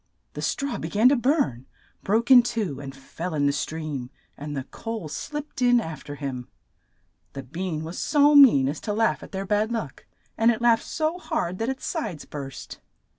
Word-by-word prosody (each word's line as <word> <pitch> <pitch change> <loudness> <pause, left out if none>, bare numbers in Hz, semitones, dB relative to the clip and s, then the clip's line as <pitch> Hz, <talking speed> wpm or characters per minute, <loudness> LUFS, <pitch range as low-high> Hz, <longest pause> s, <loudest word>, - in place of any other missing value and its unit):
The - - -6
straw 275 -3 -2
be 160 - -4
gan 215 +7 +5
to 280 - +4
burn, 250 - 0 0.3
broke 225 +6 +1
in 250 -2 +10
two, 220 - -3
and 135 -1 -8
fell 160 +5 -6
in 145 -1 +1
the 140 - +4
stream, 150 -5 -4 0.3
and 145 0 -6
the 135 - -3
coal 225 - -6
slipped 295 - -6
in 245 -1 +5
af 160 -9 -6
ter 145 - -7
him. 135 -4 -5 0.9
The 135 - -6
bean 160 +3 -4
was 165 +3 -6
so 295 0 +4
mean 255 - +7
as 145 +2 -3
to 210 - -3
laugh 225 +2 +1
at - - -11
their 195 0 -4
bad 210 +3 +1
luck, 220 - -5 0.3
and 225 +1 +5
it 235 -1 +1
laughed 235 -1 +3
so 320 +2 -1
hard 185 - -2
that 225 +2 -1
its 265 0 -4
sides 190 - -4
burst. 135 -2 -8
195 Hz, 195 wpm, -25 LUFS, 145-245 Hz, 0.9 s, in